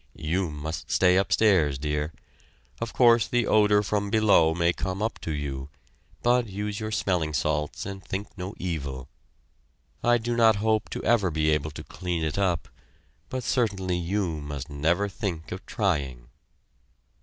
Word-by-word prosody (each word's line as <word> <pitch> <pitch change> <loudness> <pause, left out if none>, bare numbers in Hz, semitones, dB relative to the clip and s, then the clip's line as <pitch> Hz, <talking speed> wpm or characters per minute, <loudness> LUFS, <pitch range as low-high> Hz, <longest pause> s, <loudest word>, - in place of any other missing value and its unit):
You 85 +3 -1
must 75 +2 -6
stay 90 -1 +4
upstairs, 95 -7 +3
dear. 75 +2 -2 0.7
Of 115 - -3
course 115 -5 +5
the 120 +1 +1
odor 105 -1 +4
from 100 0 -1
below 100 -7 +4
may 85 0 +2
come 95 +1 -3
up 110 +2 -2
to 80 - -4
you, 70 -2 -4 0.5
but 120 0 +3
use 105 +1 -4
your 110 -1 -3
smelling 90 -7 0
salts 75 -1 -1
and 95 -1 -7
think 100 +2 -5
no 95 +2 -6
evil. 70 -7 -4 0.9
I 120 0 +4
do 120 +1 -2
not 115 -2 +5
hope 110 +1 0
to - - -5
ever 110 -5 +3
be 80 -1 +1
able 75 0 0
to 70 - -9
clean 90 -3 -3
it 80 +4 -1
up, 90 -5 0 0.6
but 130 -1 -3
certainly 100 -7 0
you 90 -3 -1
must 75 -1 -6
never 85 +8 +1
think 95 -6 -4
of 90 - -6
trying." 70 - -1
95 Hz, 155 wpm, -26 LUFS, 75-105 Hz, 0.9 s, course